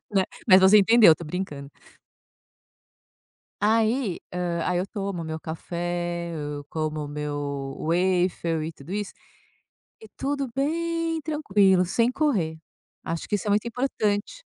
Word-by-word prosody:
né. 190 -2 +3 0.2
Mas 185 0 +8
você 190 +3 +7
entendeu, 210 -4 +7
tô 170 - -9
brincando. 150 -4 -5 1.9
Aí, 220 0 +1
hã, 175 -2 -2
aí 180 -1 +1
eu 185 - -2
tomo 195 -5 -4
meu 160 0 -5
café, 170 +1 -4
eu 145 -1 -5
como 155 -1 -2
o - - -7
meu 145 -2 -4
waffle 175 -2 +1
e 165 - -5
tudo 150 +2 -12
isso, 205 -1 -3 0.9
e 220 - -13
tudo 280 0 -2
bem 330 +3 -1
tranquilo, 205 - +3
sem 230 +7 +1
correr, 200 - 0 0.5
acho 165 0 -4
que - - 0
isso 205 - -4
é - - +1
muito 210 +3 +2
importante. 235 - -2
185 Hz, 135 wpm, -25 LUFS, 160-225 Hz, 1.9 s, Mas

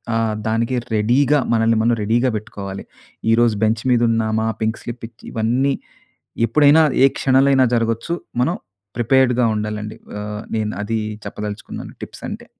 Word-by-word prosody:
ఆహ్, 115 -1 0
దానికి 115 +3 0 0.2
రెడీ‌గా 130 +7 +3
మనల్ని 115 0 +3
మనం 120 +1 +3
రెడీ‌గా 120 +4 +2
పెట్టుకోవాలి. 100 -2 -7 0.5
ఈ - - +6
రోజు 115 -2 +3
బెంచ్ 110 0 0
మీద 120 -1 +3
ఉన్నామా? 110 0 0 0.2
పింక్ 110 +1 -1
స్లిప్ 120 -1 -6
ఇచ్చి 120 0 -20
ఇవన్నీ 125 +5 +1 0.8
ఎప్పుడైనా 150 +6 +5 0.2
ఏ - - +8
క్షణాలైన 135 0 +4
జరగొచ్చు. 115 +8 -1 0.3
మనం 165 +8 +1 0.4
ప్రిపేర్డ్‌గా 125 +1 +3
ఉండాలండి. 105 0 -4 0.2
ఆ! - - -4 0.4
నేను 105 -1 -1
అది 115 +2 -2 0.3
చెప్పదలుచుకున్నాను. 105 0 -6
టిప్స్ - - -9
అంటే. - - -7
115 Hz, 140 wpm, -20 LUFS, 110-130 Hz, 0.8 s, ఏ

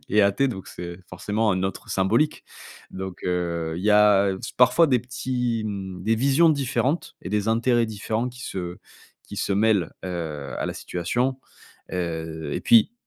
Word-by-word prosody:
est 105 -1 +4
athée 100 +8 +3
donc 95 -6 -6
c'est 85 0 -7
forcément 105 +4 0
un 95 0 -1
autre 95 - -4
symbolique. 110 +11 +1 0.5
Donc, 95 -1 -6
heu, 85 -2 -1
il 90 - -5
y 105 - +4
a, 105 -1 +6
heu, 95 - -5
s - - -5
parfois 125 +7 +5
des 130 -4 +3
petits 125 -2 -2
m 95 -3 -5
des 110 +3 +2
visions 140 +7 +4
différentes 140 +2 -1
et - - -5
des 105 +1 0
intérêts 115 +1 +3
différents 110 +3 -2
qui 125 +1 -13
se 90 -4 -5 0.5
qui - - -10
se 100 - -1
mêlent, 105 -2 +2
heu, 75 -7 -4
à - - -1
la - - -2
situation. 120 +10 -1 0.5
Heu, 80 -4 -3
et - - -2
puis 115 - +5
105 Hz, 175 wpm, -24 LUFS, 90-120 Hz, 0.5 s, a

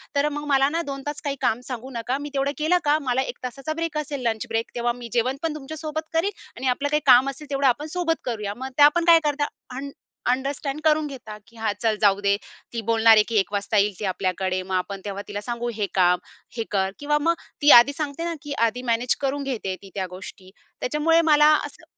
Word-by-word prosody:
तर 285 +1 +2
मग 295 - -5
मला 270 0 +4
ना 335 - +1
2 275 0 -5
तास 295 0 -4
काही 280 -1 -2
काम 225 +3 +1
सांगू 250 +1 -5
नका. 240 +3 -2
मी 290 +1 -6
तेवढं 275 0 0
केलं 315 +4 +2
का, 295 +1 +4
मला 250 +1 +2
1 265 - -5
तासाचा 275 +5 -4
ब्रेक 330 -2 -2
असेल, 290 -2 -3
लंच 220 -1 -2
ब्रेक, 225 0 -1
तेव्हा 240 0 0
मी 235 - -7
जेवण 250 +3 +1
पण 315 -2 -1
तुमच्या 305 +2 -7
सोबत 315 +1 -4
करीन 335 +5 +1 0.3
आणि 260 - -3
आपलं 280 +3 +1
काही 300 +1 +1
काम 255 +3 +7
असेल, 280 +2 -9
तेवढं 275 -1 +1
आपण 290 +5 +1
सोबत 330 -2 0
करूया." 210 -5 -3
मग 260 +1 -5
त्या 290 0 +9
पण 345 0 +1
काय 335 -1 +8
करतात? 290 0 0 0.3
अंड 280 +2 -5 0.4
अंडरस्टँड 275 +2 -2
करून 310 -1 +3
घेतात. 230 -7 -9
की 230 - -21
हां 220 -1 0
चल 225 -2 +2
जाऊ 200 -2 +4
दे. 200 0 +3 0.4
ती 230 - -2
बोलणार 225 0 +6
आहे 215 - +6
की 230 - -4
1:00 195 - +1
वाजता 205 +1 0
येईल 205 0 +3
ती 210 - -3
आपल्याकडे 185 0 -1
मग 190 0 -3
आपण 195 +2 -3
तेव्हा 200 0 -4
तिला 205 0 -5
सांगू 240 +2 -3
हे 205 -2 -1
काम, 180 -1 +4 0.4
हे 225 - 0
कर 190 -2 +1
किंवा 295 +1 +1
मग 335 +3 +3 0.3
ती 295 - +7
आधी 285 +4 +2
सांगते 300 +1 -3
ना 340 - -2
की 290 - -5
आधी 245 +3 -5
मॅनेज 240 +2 +1
करून 280 +1 -1
घेते 250 -7 -4
आहे 185 - -3
ती 195 - -13
त्या 190 -2 -2
गोष्टी 185 0 -10 0.3
त्याच्यामुळे 310 +5 +3
मला 300 -2 +5
असं - - -12
265 Hz, 235 wpm, -24 LUFS, 220-295 Hz, 0.4 s, त्या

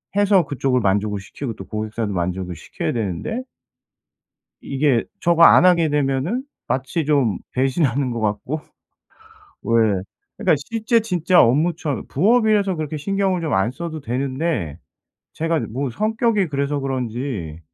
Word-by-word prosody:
해서 200 -4 +4
그쪽을 135 -2 0
만족을 105 -1 0
시키고 115 +5 -6
또 95 - -8
고객사도 110 0 -3
만족을 90 0 -2
시켜야 - - -4
되는데 115 - -3 1.2
이게 135 -3 +1 0.2
저거 170 -1 +3
안 165 - +7
하게 170 -3 +5
되면은 145 - 0 0.2
마치 135 +5 -1
좀 140 - +2
배신하는 135 0 +1
것 120 -1 -3
같고 110 +8 -2 1.0
왜 110 -5 +2 0.3
그러니까 - - +3
실제 230 +1 +1
진짜 180 -4 +3
업무처 150 +3 +1
부업이라서 210 - +3
그렇게 155 0 -4
신경을 190 +2 0
좀 155 -4 -2
안 95 +5 +2
써도 160 +2 -6
되는데 130 - -2 0.6
제가 165 0 0
뭐 130 +4 -2
성격이 215 - +1
그래서 140 0 -1
그런지 125 - -4
140 Hz, 295 characters per minute, -21 LUFS, 115-170 Hz, 1.2 s, 안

